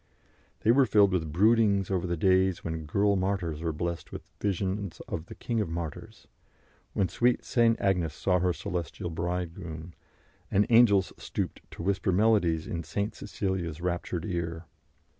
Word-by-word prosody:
They 110 Hz, -, +4 dB
were 135 Hz, +1 st, +5 dB
filled 100 Hz, -2 st, +5 dB
with 80 Hz, -4 st, -1 dB
broodings 100 Hz, +1 st, +3 dB
over 90 Hz, -1 st, 0 dB
the 85 Hz, 0 st, -1 dB
days 95 Hz, +1 st, +3 dB
when 80 Hz, -2 st, -4 dB
girl 100 Hz, +5 st, +2 dB
martyrs 95 Hz, -5 st, -1 dB
were 85 Hz, -1 st, -1 dB
blessed 85 Hz, +2 st, -4 dB
with -, -, -9 dB
visions 100 Hz, -1 st, -2 dB
of 80 Hz, -, -5 dB
the -, -, -9 dB
King 115 Hz, -2 st, -2 dB
of 105 Hz, -, -2 dB
Martyrs, 80 Hz, -2 st, -6 dB, 0.7 s
when 95 Hz, -, +1 dB
sweet 120 Hz, +4 st, +1 dB
St. 115 Hz, -2 st, +3 dB
Agnes 90 Hz, -6 st, +1 dB
saw 90 Hz, 0 st, +1 dB
her 90 Hz, 0 st, +2 dB
celestial 85 Hz, -1 st, -4 dB
Bridegroom, 85 Hz, -1 st, -4 dB, 0.6 s
and 100 Hz, +2 st, +3 dB
angels 105 Hz, -5 st, +5 dB
stooped -, -, -4 dB
to -, -, -8 dB
whisper 100 Hz, 0 st, +1 dB
melodies 90 Hz, -5 st, +3 dB
in 85 Hz, -, -3 dB
St. 100 Hz, +6 st, -2 dB
Cecilia's 95 Hz, -6 st, -3 dB
raptured 90 Hz, 0 st, -2 dB
ear. 85 Hz, -3 st, -3 dB
90 Hz, 155 wpm, -28 LUFS, 85-100 Hz, 0.7 s, were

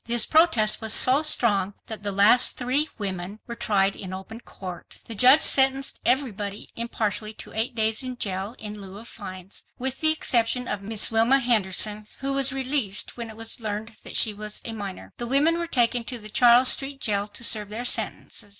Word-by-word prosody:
This 235 Hz, -1 st, +3 dB
protest 245 Hz, -11 st, +3 dB
was 220 Hz, -1 st, +4 dB
so 265 Hz, +3 st, +6 dB
strong 205 Hz, -10 st, +1 dB
that 220 Hz, -2 st, -6 dB
the 205 Hz, 0 st, -3 dB
last 200 Hz, +5 st, +4 dB
three 260 Hz, +5 st, +1 dB
women 195 Hz, -1 st, -5 dB
were 235 Hz, -, -7 dB
tried 200 Hz, -4 st, 0 dB
in 185 Hz, -2 st, -8 dB
open 190 Hz, +4 st, -9 dB
court. 185 Hz, -6 st, -11 dB
The 230 Hz, -, -6 dB
judge 255 Hz, +8 st, +6 dB
sentenced 270 Hz, 0 st, +3 dB
everybody 210 Hz, -6 st, -2 dB
impartially 220 Hz, -2 st, -3 dB
to -, -, -9 dB
eight 225 Hz, +2 st, -2 dB
days 220 Hz, +1 st, +1 dB
in 255 Hz, -1 st, -5 dB
j 205 Hz, -, -2 dB
ail 195 Hz, +5 st, -6 dB
in 210 Hz, -1 st, -8 dB
lieu 195 Hz, 0 st, -11 dB
of 225 Hz, +2 st, -11 dB
fines, 185 Hz, -2 st, -9 dB
with 260 Hz, +3 st, -4 dB
the 315 Hz, 0 st, +5 dB
exception 250 Hz, -4 st, +1 dB
of 210 Hz, -1 st, -4 dB
Miss 215 Hz, +2 st, +1 dB
Wilma 225 Hz, +4 st, +3 dB
Henderson, 215 Hz, -3 st, 0 dB
who 275 Hz, 0 st, -4 dB
was 275 Hz, 0 st, 0 dB
released 260 Hz, -6 st, -1 dB
when 235 Hz, -2 st, -7 dB
it 220 Hz, -, -12 dB
was 225 Hz, +1 st, -2 dB
learned 215 Hz, +1 st, -6 dB
that -, -, -8 dB
she 220 Hz, -, +3 dB
was 210 Hz, +1 st, -6 dB
a 230 Hz, -, -5 dB
minor. 195 Hz, -, -8 dB
The 240 Hz, -, -4 dB
women 300 Hz, +6 st, +2 dB
were 340 Hz, -, -4 dB
taken 240 Hz, -4 st, +1 dB
to 245 Hz, -, -4 dB
the 215 Hz, -2 st, -9 dB
Charles 245 Hz, +3 st, +5 dB
Street 270 Hz, 0 st, +1 dB
Jail 205 Hz, -3 st, -1 dB
to 210 Hz, +3 st, -8 dB
serve 210 Hz, -3 st, +2 dB
their 225 Hz, +4 st, -6 dB
sentences. 205 Hz, -, -2 dB
225 Hz, 200 wpm, -24 LUFS, 205-255 Hz, -, so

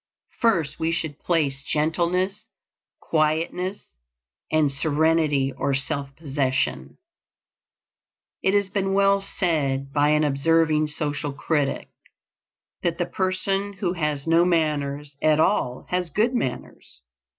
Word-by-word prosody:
First 170 Hz, -12 st, +1 dB
we 160 Hz, 0 st, 0 dB
should 160 Hz, -3 st, -3 dB
place 145 Hz, -6 st, 0 dB
gentleness, 170 Hz, +7 st, -1 dB, 0.5 s
quietness, 165 Hz, +5 st, -1 dB, 0.6 s
and 155 Hz, -2 st, +3 dB
serenity 150 Hz, -1 st, +1 dB
or 140 Hz, -, 0 dB
self 140 Hz, 0 st, -3 dB
possession. 135 Hz, -, -2 dB, 1.4 s
It 190 Hz, +1 st, +2 dB
has 200 Hz, -1 st, +2 dB
been 195 Hz, 0 st, -1 dB
well 200 Hz, 0 st, +4 dB
said 140 Hz, -8 st, -1 dB
by 145 Hz, 0 st, +3 dB
an 150 Hz, 0 st, +3 dB
observing 155 Hz, +2 st, +2 dB
social 145 Hz, -1 st, -3 dB
critic, 145 Hz, -1 st, -1 dB, 0.9 s
that 170 Hz, -1 st, -1 dB
the 175 Hz, -, 0 dB
person 195 Hz, +2 st, -1 dB
who 185 Hz, -2 st, -2 dB
has 150 Hz, -5 st, -2 dB
no 165 Hz, +1 st, +4 dB
manners 150 Hz, -4 st, 0 dB
at 155 Hz, 0 st, +3 dB
all 130 Hz, -8 st, +1 dB
has 180 Hz, -1 st, -1 dB
good 220 Hz, -, +1 dB
manners. 130 Hz, -, -4 dB
155 Hz, 115 wpm, -24 LUFS, 145-180 Hz, 1.4 s, well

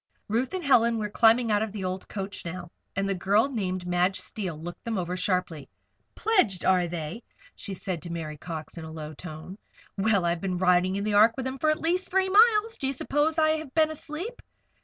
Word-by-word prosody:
Ruth 240 Hz, -, -1 dB
and 370 Hz, -, -3 dB
Helen 235 Hz, -4 st, +4 dB
were 210 Hz, -2 st, -3 dB
climbing 230 Hz, +1 st, +4 dB
out 205 Hz, 0 st, +3 dB
of 220 Hz, -1 st, -2 dB
the 205 Hz, -2 st, -5 dB
old 185 Hz, +1 st, -4 dB
coach 195 Hz, 0 st, -6 dB
now, 175 Hz, 0 st, -7 dB, 0.2 s
and 195 Hz, 0 st, 0 dB
the 195 Hz, -, +1 dB
girl 200 Hz, +6 st, +2 dB
named 185 Hz, -7 st, -3 dB
Madge 180 Hz, +2 st, +1 dB
Steele 185 Hz, -3 st, -5 dB
looked 175 Hz, +2 st, -8 dB
them 230 Hz, -3 st, -2 dB
over 180 Hz, 0 st, -2 dB
sharply. 180 Hz, -5 st, -1 dB, 0.5 s
"Pledged, 370 Hz, -, +2 dB
are 180 Hz, -2 st, +3 dB
they?" 170 Hz, +5 st, -5 dB, 0.3 s
she 195 Hz, -, -7 dB
said 180 Hz, -3 st, -4 dB
to 170 Hz, -, -8 dB
Mary 155 Hz, -3 st, -5 dB
Cox, 165 Hz, 0 st, -7 dB
in -, -, -7 dB
a 160 Hz, -, -8 dB
low 155 Hz, -1 st, -7 dB
tone. 160 Hz, +5 st, -9 dB, 0.4 s
"Well! 200 Hz, -3 st, +2 dB
I've 170 Hz, 0 st, 0 dB
been 185 Hz, -2 st, -2 dB
riding 180 Hz, +1 st, +3 dB
in 200 Hz, -, -2 dB
the 210 Hz, 0 st, -1 dB
Ark 215 Hz, +3 st, +6 dB
with 260 Hz, -, -3 dB
them 260 Hz, +1 st, -4 dB
for 310 Hz, +2 st, +3 dB
the -, -, -13 dB
last 355 Hz, +3 st, 0 dB
three 380 Hz, 0 st, +2 dB
miles. 440 Hz, +2 st, +4 dB
Do 270 Hz, -, -1 dB
you 270 Hz, -, -1 dB
suppose 295 Hz, +4 st, 0 dB
I 310 Hz, -1 st, +4 dB
have 310 Hz, -4 st, -9 dB
been 315 Hz, -1 st, +4 dB
asleep?" 320 Hz, +10 st, -7 dB
200 Hz, 220 wpm, -27 LUFS, 180-265 Hz, 0.5 s, Ark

